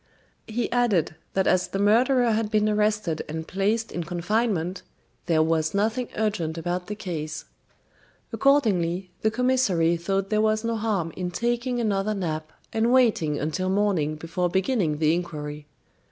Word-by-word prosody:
He 235 +2 -2
added 230 -11 +2 0.2
that 190 -1 +1
as 180 0 +2
the - - -4
murderer 235 +4 +3
had 220 -1 0
been 215 -1 +2
arrested 210 -5 +1
and 160 +1 -5
placed 210 +4 0
in 175 - -3
confinement, 180 +1 -1 0.5
there 160 -3 +3
was 160 +1 0
nothing 225 +4 0
urgent 205 -7 -1
about 175 +2 -3
the 210 - -4
case. 155 -6 -5 0.9
Accordingly, 190 -10 +2
the 220 - +3
commissary 215 -9 +2
thought 195 +3 -2
there 215 0 +3
was 215 0 +1
no 230 0 -1
harm 205 -7 -1
in 180 -1 -3
taking 240 +5 -1
another 210 -2 0
nap 160 -4 -3 0.2
and 225 +2 +2
waiting 220 - +3
until 170 +5 -1
morning 190 -7 +1
before 165 +3 -2
beginning 190 - +1
the 155 0 +3
inquiry. 150 -4 -5
195 Hz, 150 wpm, -25 LUFS, 165-220 Hz, 0.9 s, murderer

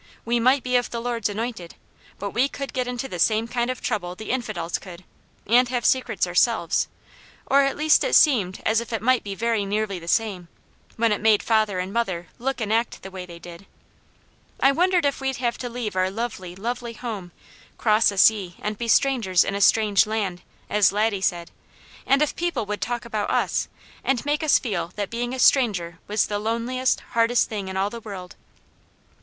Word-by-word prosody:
We 235 +1 +1
might 255 +2 +3
be 250 0 -1
of 245 - -1
the 235 - -4
Lord's 230 -2 -2
anointed, 210 -4 -5 0.4
but 200 0 -4
we 260 +4 +2
could 275 -1 -6
get 255 -2 -1
into 250 +1 -4
the 180 - -7
same 220 +5 +2
kind 240 +1 -1
of 255 - -4
trouble 180 -6 -2
the 220 - -5
infidels 215 -10 -2
could, 185 -1 -11 0.4
and 245 +3 +4
have 245 -2 -2
secrets 240 -8 +2
ourselves, 180 +1 +1 0.6
or 275 +1 +4
at 275 0 0
least 305 +1 +4
it - - +1
seemed 210 - +3
as 220 +1 +3
if 235 - -9
it 225 - -2
might 255 +1 +3
be 200 -1 -5
very 230 -1 0
nearly 200 -1 -2
the 170 - -12
same, 195 -4 0 0.5
when 230 -1 +2
it 210 - 0
made 215 -1 +4
father 215 -4 +2
and 185 +2 -3
mother 185 -7 -2
look 270 +3 -2
and 220 -1 -1
act 230 +1 -1
the 190 - -8
way 185 -1 -7
they 170 -1 -10
did. 175 +3 -12 0.9
I 270 - +5
wondered 355 +2 +2
if 280 -1 0
we'd 265 0 -1
have 240 -1 -2
to 245 - -4
leave 235 -4 -4
our 185 0 +2
lovely, 195 -4 -5
lovely 235 +3 -4
home, 215 -7 -6 0.5
cross 215 0 +3
a 200 - -8
sea 190 -3 +4
and 210 0 -4
be 235 - -3
strangers 230 -7 +3
in 195 - -3
a 200 - -2
strange 210 0 +4
land, 200 -5 -2 0.3
as 205 -2 +3
Laddie 205 -1 0
said; 175 -2 -1 0.6
and 275 +2 +4
if 300 - -2
people 345 -9 -2
would 210 0 -4
talk 240 0 -3
about 215 -3 -2
us, - - 0 0.4
and 270 0 0
make 295 +1 0
us 310 -2 +4
feel 185 -7 -3
that 205 -2 -4
being 240 +1 -2
a 260 - -4
stranger 195 -11 +2
was 210 0 +1
the 205 -1 -3
loneliest, 235 +4 0
hardest 230 +1 +2
thing 205 -3 -4
in 190 0 -4
all 195 +2 0
the 235 - -7
world. 190 -4 -8
220 Hz, 205 wpm, -24 LUFS, 195-245 Hz, 0.9 s, I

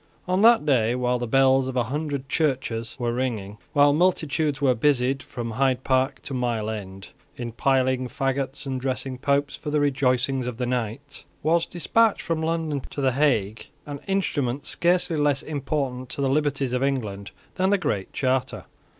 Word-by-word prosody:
On 185 +2 +1
that 230 -6 +6
day, 120 -5 +2
while 125 0 0
the 120 - -3
bells 135 +1 +4
of 130 - -4
a 125 - +2
hundred 140 +2 -3
churches 130 -6 -1
were 120 -2 -1
ringing, 110 -5 -3
while 145 -1 +5
multitudes 155 -4 +1
were 135 -2 +3
busied, 130 +1 +1
from 120 -3 -6
Hyde 130 +1 +1
Park 130 0 +1
to 140 - -6
Mile 120 -4 -1
End, 95 -3 -7 0.3
in 120 -1 -5
piling 130 +1 +1
faggots 135 +2 -2
and 130 -2 -3
dressing 130 0 -3
Popes 140 +1 +1
for 150 - -6
the 150 0 +1
rejoicings 130 -2 +1
of 125 -2 -4
the 125 - -1
night, 125 +3 -4 0.2
was 165 +2 +2
despatched 220 +6 +2
from 165 -1 -1
London 160 -3 -1
to - - -7
the 135 -2 +2
Hague 120 -7 0 0.2
an 145 -1 -6
instrument 145 -9 -1
scarcely 175 -1 +1
less 145 -2 +1
important 135 -4 -3
to - - -6
the 135 - +1
liberties 140 -2 0
of 125 - 0
England 110 -8 -2 0.3
than 185 +1 +2
the 200 - +4
Great 125 - -2
Charter. 130 -1 -1
135 Hz, 175 wpm, -24 LUFS, 125-145 Hz, 0.3 s, that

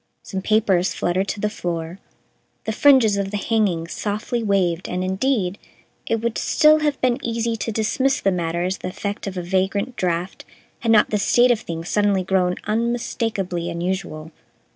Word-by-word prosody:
Some 190 -2 -4
papers 195 -3 +2
fluttered 185 +3 0
to 205 - -3
the 210 - 0
floor, 175 -3 -4 0.7
the 220 - -1
fringes 230 -4 +5
of 200 -1 -1
the 205 - -3
hangings 200 -7 0
softly 215 +3 -2
waved, 190 -5 0
and, 180 +1 -2
indeed, 190 0 0 0.5
it 225 0 -1
would 235 -1 -1
still 310 0 +4
have 295 -2 0
been 255 +1 +1
easy 230 0 -1
to 225 - -3
dismiss 260 +5 +1
the 195 - +1
matter 170 -1 -1
as 185 +2 -2
the - - -5
effect 200 +2 -5
of 190 -1 -5
a 180 - -3
vagrant 195 +6 -1
draft 175 +1 -2 0.4
had 230 - +1
not 215 -2 +5
the 210 - +1
state 240 +4 +4
of 235 - +2
things 165 -2 -6
suddenly 205 -2 +2
grown 180 -1 +1
unmistakably 215 -5 -2
unusual. 170 -2 -4
200 Hz, 170 wpm, -22 LUFS, 180-225 Hz, 0.7 s, fringes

